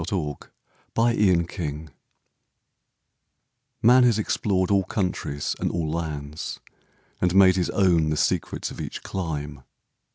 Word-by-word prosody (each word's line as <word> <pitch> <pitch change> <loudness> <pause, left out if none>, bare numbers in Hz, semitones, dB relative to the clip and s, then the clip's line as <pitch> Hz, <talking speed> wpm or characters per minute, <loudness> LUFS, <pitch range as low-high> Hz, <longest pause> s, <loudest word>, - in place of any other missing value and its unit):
THE 80 - -3 0.8
UNDISCOVERED 105 -7 +3
COUNTRY 80 -4 -5 2.0
Man 125 +3 +7
has 120 -4 +4
explored 100 -3 0
all 100 -1 +3
countries 90 -7 -2
and - - 0
all 80 -3 -2
lands, 75 -2 -5 0.6
And 90 0 +1
made 95 -1 +7
his 90 -2 0
own 85 -5 +3
the 75 - -1
secrets - - -1
of - - -7
each - - -6
clime. 75 -6 -4
90 Hz, 120 wpm, -24 LUFS, 75-100 Hz, 2.0 s, Man